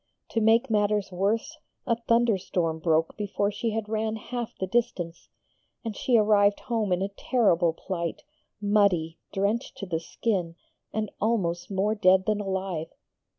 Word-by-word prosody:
To 225 - 0
make 225 +3 +4
matters 210 -2 +1
worse, 215 - -1 0.3
a 230 - +2
thunderstorm 200 -8 +1
broke 160 0 +1
before 205 0 -1
she 230 +3 -2
had 220 -1 -2
ran 220 0 -1
half 235 +1 -5
the 190 - 0
distance, 185 -6 -2 0.6
and 220 -2 -3
she 245 +3 +2
arrived 205 -1 +4
home 225 -5 -1
in 180 +1 +2
a 195 - -1
terrible 195 -6 +2
plight, 170 -1 -4 0.4
muddy, 200 -6 +2
drenched 205 +5 -1
to 200 - -5
the 165 -4 -2
skin, 175 -1 -2 0.4
and 215 -1 -2
almost 190 -6 0
more 200 +2 +1
dead 190 -2 +4
than 210 -1 +1
alive. 190 -4 -2
205 Hz, 150 wpm, -27 LUFS, 180-220 Hz, 0.6 s, make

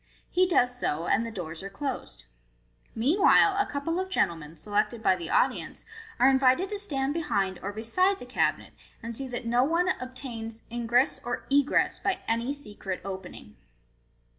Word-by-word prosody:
He 370 +1 +3
does 250 -8 +2
so, 160 -4 -1
and 220 - +2
the 230 - -5
doors 170 -5 -6
are 195 - -6
closed. 265 +5 -5 0.7
Meanwhile, 345 - +5
a 405 - +2
couple 310 +5 -2
of 375 0 -3
gentlemen, 165 - -1
selected 210 +6 -1
by 190 - +4
the 170 -2 -6
audience, - - 0 0.3
are 255 - +6
invited 265 +7 +4
to 415 - -3
stand 280 -8 -1
behind 195 - -1
or 200 - -3
bedde 300 - +1
the - - -10
cabinet, - - -1 0.3
and 230 0 -5
see 270 +3 -4
that 245 -2 -5
no 240 +2 +3
one 335 +6 +2
obtains 240 -3 -6
ingress 240 +3 +2
or 240 +1 -4
egress 285 0 +3
by 380 - -1
any 230 +3 0
secret 210 -9 -6
opening. 190 - -8
245 Hz, 165 wpm, -28 LUFS, 205-285 Hz, 0.7 s, are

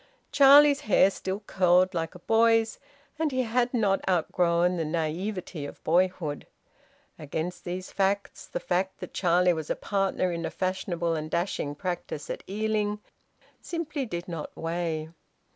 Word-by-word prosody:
Charlie's 285 +1 +7
hair 205 -6 +4
still 190 +1 -4
curled 185 -1 +3
like 165 -1 -3
a - - -10
boy's, 225 0 +3 0.4
and 320 -2 +1
he 255 -1 +1
had 240 +1 +1
not 205 -6 +2
outgrown 175 0 +2
the 165 - 0
naivete 165 +2 -3
of 145 - -10
boyhood. 175 -3 0 0.7
Against 160 +4 -4
these 180 +1 -5
facts 200 +1 -1
the - - -4
fact 185 +2 -1
that - - -8
Charlie 180 0 +3
was 160 -2 -5
a - - 0
partner 195 -2 0
in 170 -1 -3
a - - -2
fashionable 180 -3 -2
and 155 -1 -3
dashing 170 -4 -2
practice 175 -3 -4
at - - -5
Ealing 210 0 -1 0.6
simply 305 -5 -4
did 175 -3 -5
not 165 -4 -5
weigh. 165 -1 -2
185 Hz, 145 wpm, -27 LUFS, 170-210 Hz, 0.7 s, Charlie's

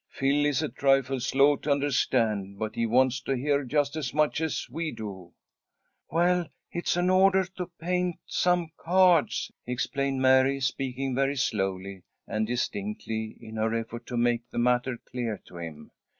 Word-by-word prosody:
"Phil 145 +2 +1
is 145 -4 +1
a - - -1
trifle 135 +1 +2
slow 135 +4 +4
to 150 - -6
understand, 115 -8 +1
but 110 +1 -3
he 115 0 0
wants 130 +2 +3
to 135 +1 -1
hear 140 +2 +1
just 145 +2 0
as 145 -4 -3
much 155 +1 +2
as 160 -1 -1
we 165 -1 -3
do." 95 -5 -8 0.8
"Well, 175 +1 +2 0.2
it's 175 0 -1
an 180 +1 +2
order 190 0 +5
to 180 -1 -4
paint 180 +1 0
some 175 -2 +1
cards," 180 -2 +3 0.2
explained 135 +2 -1
Mary, 130 +1 +4
speaking 130 0 -2
very 135 +2 +1
slowly 95 -6 -2 0.3
and 110 0 -1
distinctly 110 -1 -3
in 110 0 -9
her 110 +1 0
effort 115 +1 -5
to 125 - -3
make 120 0 +1
the - - -8
matter 125 +1 +1
clear 120 -4 -3
to 90 - -12
him. 80 -3 -8
130 Hz, 160 wpm, -27 LUFS, 115-145 Hz, 0.8 s, order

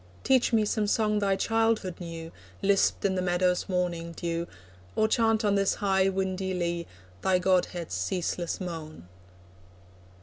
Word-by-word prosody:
Teach 260 -2 +3
me 220 -2 +3
some 210 0 0
song 210 0 +2
thy 200 -1 +2
childhood 225 -4 0
knew, 165 -2 -7 0.3
Lisped 195 0 +2
in 195 - +2
the 185 - 0
meadow's 180 +1 +1
morning 175 -2 -1
dew, 170 0 -3 0.5
Or 220 - +3
chant 225 0 +2
on 205 - +3
this 195 -1 +2
high 195 -1 +2
windy 190 0 -2
lea, 170 -1 -2 0.3
Thy 190 -1 +3
godhead's 180 - 0
ceaseless 170 - -2
moan. 160 - -7
185 Hz, 140 wpm, -28 LUFS, 170-205 Hz, 0.5 s, Teach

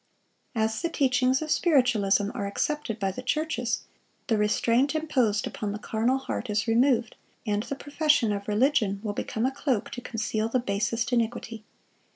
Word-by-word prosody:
As 220 0 0
the 335 - 0
teachings 260 -2 +2
of 310 - -4
Spiritualism 215 - +3
are 200 - -3
accepted 255 +2 -2
by 195 -2 0
the 225 - -7
churches, 255 -3 -1 0.4
the 230 - +1
restraint 235 +7 +2
imposed 255 -10 +1
upon 205 -2 -4
the - - -4
carnal 230 +4 0
heart 265 -3 -4
is 210 +2 0
removed, 235 0 +2 0.3
and 210 -2 0
the 250 +5 -5
profession 290 -4 +1
of 200 -1 -3
religion 215 -2 +2
will 210 -2 -2
become 220 +2 -2
a 260 - +1
cloak 265 -5 -1
to 245 - -6
conceal 220 -1 -2
the 255 - +1
basest 225 +1 -1
iniquity. 230 -1 -1
230 Hz, 165 wpm, -27 LUFS, 210-265 Hz, 0.4 s, Spiritualism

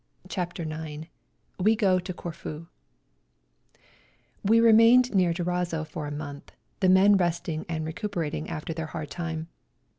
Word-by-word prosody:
CHAPTER 175 -2 -4
IX 155 0 -6 0.5
WE 215 +4 +4
GO 195 -4 +3
TO 180 +1 -5
CORFU 165 -2 -7 1.8
We 225 +3 +5
remained 230 +2 +6
near 185 -3 +3
Durazzo 175 -1 -1
for 155 -1 -6
a - - -5
month, 145 -1 -7 0.3
the 185 - +3
men 195 +2 +6
resting 170 -3 -1
and 160 -2 -2
recuperating 165 -3 -3
after 160 +2 -4
their 160 0 -4
hard 155 -2 -6
time. 165 -2 -4
170 Hz, 130 wpm, -27 LUFS, 160-190 Hz, 1.8 s, remained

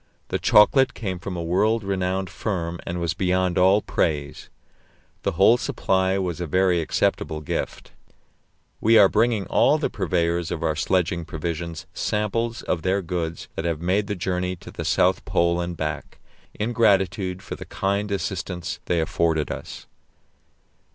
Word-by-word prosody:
The - - -1
chocolate 130 +5 +5
came 95 -5 -4
from 90 +1 -5
a 85 - -3
world 105 +6 +1
renowned 95 -1 -1
firm, 85 -3 -3
and 85 +1 -3
was 85 -1 -1
beyond 90 -1 +1
all 95 +3 +4
praise. 75 -2 -2 0.7
The - - -1
whole 100 +7 +5
supply 95 -4 0
was 90 -3 -2
a 85 - -2
very 90 +1 +2
acceptable 80 0 0
gift. 75 - -4 0.9
We 115 +1 +5
are 100 - +8
bringing 110 -1 +1
all 145 +3 +3
the 150 - -2
purveyors 85 -3 0
of 85 - -4
our 80 -1 +1
sledging 85 +1 0
provisions 85 0 -5
samples 115 +2 -1
of 85 - -1
their 95 +2 0
goods 85 -2 -4
that 80 - -3
have 85 -3 -1
made 95 +4 0
the 105 - -2
journey 90 0 -2
to - - -12
the - - -6
South - - +2
Pole 85 0 +1
and 85 -1 -4
back, 75 -1 -4 0.4
in 115 +3 -2
gratitude 95 -4 +2
for - - -6
the - - -9
kind 100 +1 -1
assistance 95 -3 -3
they 85 -2 +1
afforded 80 -2 0
us. - - -7
90 Hz, 160 wpm, -24 LUFS, 85-100 Hz, 0.9 s, are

